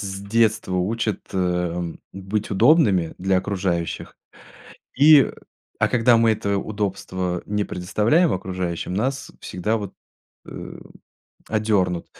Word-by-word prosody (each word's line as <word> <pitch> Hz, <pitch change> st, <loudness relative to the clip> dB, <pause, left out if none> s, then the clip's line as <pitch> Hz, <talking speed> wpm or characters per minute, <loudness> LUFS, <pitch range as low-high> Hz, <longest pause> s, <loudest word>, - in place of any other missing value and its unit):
с 95 Hz, -1 st, -5 dB
детства 110 Hz, -2 st, +1 dB
учат, 110 Hz, +4 st, -1 dB
эм, 90 Hz, -2 st, -2 dB
быть 95 Hz, +2 st, -3 dB
удобными 105 Hz, -, +4 dB
для 95 Hz, 0 st, +2 dB
окружающих. 90 Hz, -4 st, -3 dB, 0.8 s
И, 145 Hz, 0 st, +7 dB, 0.5 s
а -, -, +2 dB
когда 120 Hz, -1 st, +4 dB
мы 115 Hz, 0 st, +4 dB
это 100 Hz, -1 st, -1 dB
удобство 95 Hz, -3 st, -3 dB
не 105 Hz, 0 st, -1 dB
предоставляем 105 Hz, -, +1 dB
окружающим, 90 Hz, -2 st, -3 dB
нас 130 Hz, +6 st, -2 dB
всегда 105 Hz, +5 st, -2 dB
вот, 100 Hz, -3 st, -6 dB, 0.5 s
э, -, -, -8 dB, 0.7 s
одернут. 100 Hz, -6 st, 0 dB
100 Hz, 110 wpm, -22 LUFS, 90-110 Hz, 0.8 s, И